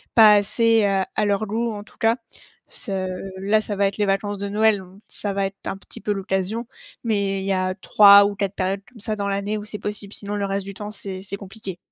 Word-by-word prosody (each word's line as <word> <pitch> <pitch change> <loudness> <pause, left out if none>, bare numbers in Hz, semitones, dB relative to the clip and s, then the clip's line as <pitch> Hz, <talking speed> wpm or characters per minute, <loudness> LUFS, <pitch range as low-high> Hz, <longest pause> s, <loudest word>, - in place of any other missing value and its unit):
pas 215 -2 +9
assez, 220 +2 +3
heu, 195 -1 +2
à 215 - +1
leur 205 +1 +1
goût 225 +3 -1
en 205 -1 -6
tout - - -22
cas. 225 +2 +3 0.5
Ce 190 -4 -4 0.3
là 215 +2 +3
ça 210 - -4
va 200 0 +2
être 195 0 -1
les 205 -1 +1
vacances 195 +1 -1
de 200 0 -3
Noël, 215 0 +3
donc 190 +1 -14
ça 205 -1 -3
va 195 0 0
être 195 0 -4
un 195 - -3
petit - - -10
peu 210 - -1
l'occasion, 195 +4 -2 0.4
mais 200 -3 0
il 190 - -5
y 195 - +1
a 185 0 0
3 200 +1 +7
ou 205 0 -1
4 200 0 -2
périodes 195 +1 -1
comme 235 -2 -16
ça 215 +1 -2
dans 200 -1 -3
l'année 200 +2 -1
où 205 - -8
c'est 210 - -6
possible, 205 0 -3
sinon 205 0 -3
le 200 -1 -1
reste 195 0 -2
du 200 - -7
temps, 205 +1 -7
c'est 195 -3 -5
c'est 200 0 -5
compliqué. 195 -2 -7
200 Hz, 245 wpm, -23 LUFS, 195-210 Hz, 0.5 s, pas